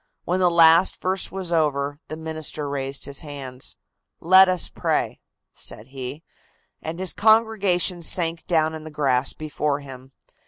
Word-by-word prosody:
When 180 +2 0
the 180 -1 +4
last 165 +1 +5
verse 190 +1 -2
was 185 -2 -4
over, 145 -3 0
the 155 - -6
minister 155 -2 -5
raised 140 -1 -3
his 140 0 -5
hands. 135 -4 -7 0.4
"Let 185 +2 +6
us 185 -2 +3
pray," - - -2 0.3
said 110 +5 -7
he, 135 +3 -7 0.6
and 160 +1 -5
his 185 -1 -2
congregation 205 -5 +2
sank 165 0 +1
down 160 -2 +2
in 160 -1 -7
the 155 - -8
grass 135 -4 0
before 150 -1 -2
him. 135 -1 -11
160 Hz, 150 wpm, -23 LUFS, 140-180 Hz, 0.6 s, Let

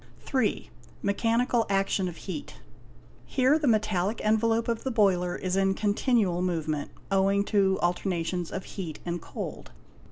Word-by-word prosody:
y. 260 - +1 0.4
Mechanical 230 +4 +2
action 195 -1 +1
of 175 - -6
heat. 170 -7 -6 0.7
Here 265 +4 +3
the 300 - 0
metallic 215 -2 +1
envelope 225 +1 +2
of 230 -1 -1
the 265 - -1
boiler 190 -7 +2
is 185 -1 -2
in 195 0 +2
continual 205 -3 +1
movement, 160 -5 -1 0.2
owing 195 +1 +3
to 195 -2 +2
alternations 175 -1 -1
of 190 - -4
heat 170 -6 -6
and 175 -1 -3
cold. - - -7
195 Hz, 135 wpm, -28 LUFS, 180-225 Hz, 0.7 s, Here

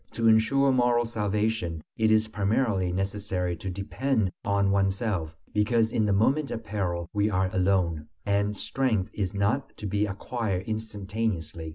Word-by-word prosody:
To 115 0 +1
ensure 135 +5 +4
moral 120 -2 +3
salvation, 105 -5 -1 0.2
it 110 -1 +2
is 110 0 +4
primarily 105 -2 0
necessary 95 -1 -2
to 95 - -5
depend 100 +3 -1
on 100 -1 +2
oneself, 95 -4 0 0.2
because 110 +1 +2
in 110 -2 +2
the - - +2
moment 135 +9 +2
of 115 - -4
peril 90 -5 -2
we 105 0 +2
are 95 -2 +1
alone. 90 -5 +1 0.2
And 100 0 +1
strength 115 -8 0
is 100 -2 -2
not 105 +8 0
to - - -7
be 105 +1 0
acquired 100 -1 -3
instantaneously. 105 -7 -3
105 Hz, 150 wpm, -27 LUFS, 95-110 Hz, 0.2 s, ensure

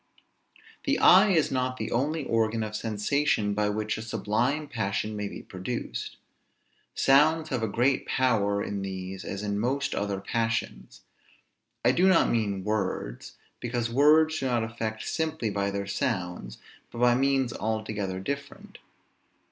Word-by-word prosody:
The 280 0 +2
eye 190 +4 +7
is 165 -6 +2
not 130 -1 -1
the 110 -2 -4
only 145 +4 0
organ 115 0 +1
of 105 0 -5
sensation 110 +1 0
by 105 0 +1
which 105 +1 -2
a - - -5
sublime 120 +7 -1
passion 110 -4 -2
may 105 -1 -3
be - - -8
produced. 95 - -5 0.8
Sounds 155 +4 +4
have 130 -4 -1
a 110 - 0
great 125 +6 +1
power 100 -6 +1
in 100 -1 -4
these 95 0 -5
as 100 0 -5
in 100 -1 -1
most 135 +5 -1
other 100 -1 -2
passions. 115 +3 -3 0.8
I - - +6
do 185 +2 +3
not 185 -3 +4
mean 100 -5 0
words, 95 - -3 0.2
because 120 -1 -2
words 155 +4 +4
do 135 - -1
not 120 -3 +1
affect 110 -1 -4
simply 160 -9 -1
by 100 0 -1
their 100 0 -3
sounds, 90 - -3 0.3
but - - -10
by 120 0 +4
means 135 -1 +1
altogether 110 -3 -3
different. 140 +8 -6
115 Hz, 150 wpm, -27 LUFS, 100-135 Hz, 0.8 s, eye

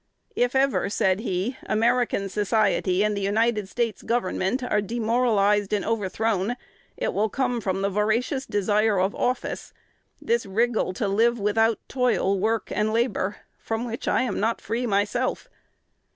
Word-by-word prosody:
"If 245 +1 +1
ever," 265 -6 +2
said 190 -1 +1
he, 215 +3 -2
"American 230 -2 +1
society 205 -2 +1
and 210 0 +1
the 200 - -3
United 210 0 +1
States 230 -1 -2
Government 235 +1 -1
are 210 -4 +1
demoralized 215 -2 +1
and 205 - 0
overthrown, 220 0 -1 0.4
it - - -1
will 215 +2 +1
come 245 0 -1
from 190 -1 -2
the 200 - +2
voracious 230 +7 0
desire 205 0 +2
of 190 +2 +1
office, 250 +1 -2 0.5
this 470 +1 0
wriggle 225 -1 0
to 205 +2 -2
live 230 +4 +2
without 225 +2 +2
toil, 245 -6 +1
work, 220 +3 -1
and 210 +1 0
labor, 215 -3 -1 0.2
from 225 +2 -3
which 230 -1 -5
I - - +2
am 235 -6 -2
not 225 +2 0
free 240 +2 -2
myself." 210 +5 0
220 Hz, 150 wpm, -25 LUFS, 200-240 Hz, 0.5 s, ever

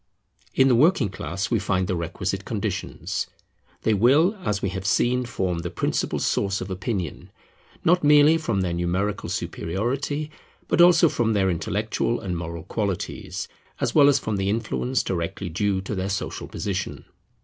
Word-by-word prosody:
In 135 - +5
the 130 - +4
working 135 - +4
class 95 +2 -4
we 115 - +3
find 95 -1 0
the 90 - -1
requisite 85 -1 -3
conditions. - - -3 0.6
They 110 - +3
will, 140 - +4
as 105 -1 0
we 100 - +1
have 95 0 -5
seen, 125 +5 +2
form 90 -6 -1
the 85 +1 -4
principal - - -1
source 100 -1 0
of 95 +1 -6
opinion, 95 -2 -4 0.6
not 180 +1 +4
merely 150 +2 +6
from 100 -11 -1
their 90 -2 -1
numerical 90 +4 -1
superiority, 135 - -2 0.4
but - - +3
also 175 -1 +7
from 115 -6 +1
their 95 -2 +2
intellectual 85 - -1
and 90 -3 -3
moral 85 -1 -5
qualities, 100 0 -3 0.3
as - - 0
well 145 -2 +7
as 140 - +4
from 110 -6 -2
the 95 0 0
influence 115 +3 0
directly 90 +1 -3
due 95 +3 0
to 95 - -5
their 95 0 -2
social 100 - -3
position. 100 -1 -4
100 Hz, 160 wpm, -24 LUFS, 95-130 Hz, 0.6 s, also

